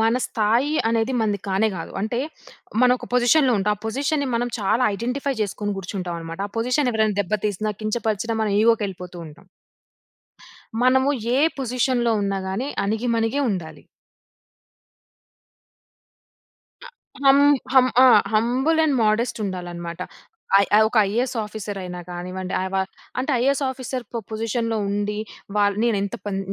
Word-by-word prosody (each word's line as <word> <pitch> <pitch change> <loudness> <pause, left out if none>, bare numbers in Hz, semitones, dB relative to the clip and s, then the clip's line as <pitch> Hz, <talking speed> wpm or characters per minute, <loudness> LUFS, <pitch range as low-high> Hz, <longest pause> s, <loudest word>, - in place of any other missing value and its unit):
మన 225 +2 +3
స్థాయి 230 +7 +1
అనేది 230 +2 +1
మనది 210 -2 0
కానే 195 +3 +2
కాదు. 165 - -6
అంటే 220 +4 -1 0.6
మనం 250 - +6
ఒక - - -9
పొజిషన్‌లో 250 +2 +4
ఉంటాం. 210 +2 +1
ఆ - - -28
పొజిషన్‌ని 280 +4 -1
మనం 240 +1 0
చాలా 210 +5 +1
ఐడెంటిఫై 250 +6 -2
జేసుకొని 205 0 -3
కూర్చుంటాం 185 -2 -4
అన్నమాట. 165 +2 -7
ఆ - - -26
పొజిషన్ 250 +3 +1
ఎవరన్నా 215 -2 +1
దెబ్బ 200 - -4
తీసినా 210 +1 -2
కించపరిచినా 220 0 -1
మనం 210 -2 0
ఇగో‌కి 225 -1 +3
ఎళ్ళిపోతూ 180 -1 -9
ఉంటాం. 150 0 -15 1.4
మనము 260 +2 +4 0.3
ఏ - - +3 0.2
పొజిషన్‌లో 250 -2 0
ఉన్నా‌గాని 195 +5 -2 0.2
అణిగిమణిగే 225 +4 0
ఉండాలి. 175 -5 -5 3.0
అ - - -10 0.4
హం 275 0 +7 0.4
హం 260 -1 +7 0.2
ఆ! - - +8 0.3
హంబుల్ 250 +9 +2
అండ్ 295 -3 +2
మోడెస్ట్ 220 +3 +1
ఉండాలన్నమాట. 175 -2 -5 0.6
ఐ 205 +1 +4
ఒక 230 - -5
ఐఏఎస్ 240 +5 -1
ఆఫీసర్ 210 -1 -6
అయినా 180 -1 -6
కానివ్వండి, 185 +1 -5
ఆవ 190 0 -4 0.4
అంటే 260 +4 -1
ఐఏఎస్ 275 +3 +2
ఆఫీసర్‌కొ 255 -3 -5
పొజిషన్‌లో 225 +1 -1
ఉండి 205 +1 -2 0.4
వాల్ 205 -1 +2
నేనెంత 200 -4 0
పన్ 200 -2 -2
220 Hz, 130 wpm, -23 LUFS, 200-250 Hz, 3.0 s, ఆ